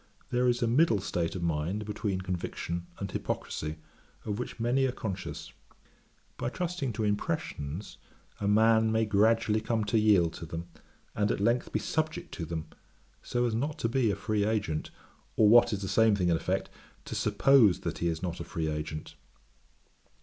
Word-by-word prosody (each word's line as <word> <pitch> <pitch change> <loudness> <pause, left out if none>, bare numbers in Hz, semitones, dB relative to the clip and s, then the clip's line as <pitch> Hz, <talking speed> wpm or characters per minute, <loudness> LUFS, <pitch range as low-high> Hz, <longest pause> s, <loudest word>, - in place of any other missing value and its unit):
There 125 0 +2
is 120 0 +2
a - - +2
middle 120 -2 +4
state 90 -3 -2
of 90 - -4
mind 85 +6 -1
between 100 -2 -2
conviction 85 -1 -4
and 100 -1 -5
hypocrisy, 75 0 -3 0.5
of 105 0 -3
which 125 - -5
many 125 +3 +2
are - - -1
conscious. 110 -7 -6 0.8
By - - -2
trusting 170 -4 -2
to 110 - -2
impressions, 100 -4 -3 0.4
a 100 - -1
man 110 +1 +4
may 110 0 +2
gradually 110 +1 +3
come 110 0 0
to 105 +2 +2
yield 100 -6 +4
to 85 - -8
them, 85 +1 -5 0.5
and 105 -1 +1
at - - 0
length 115 +4 +1
be - - +1
subject 160 +2 -2
to 85 - -4
them, 80 -1 -4 0.6
so 120 0 0
as 120 - 0
not 145 +7 -1
to - - 0
be 120 -1 +2
a 100 - +1
free 105 +1 -1
agent, 100 -7 -1 0.5
or 110 - +5
what 120 +2 +7
is 100 -2 -2
the - - -2
same 110 +1 +4
thing 90 -3 +1
in 85 - +4
effect, - - -2 0.3
to - - -6
suppose 125 -10 +4
that - - -4
he 85 - 0
is 80 +1 -2
not 85 -1 -3
a - - -4
free 80 -1 -3
agent. 75 0 -5
105 Hz, 180 wpm, -29 LUFS, 90-115 Hz, 0.8 s, what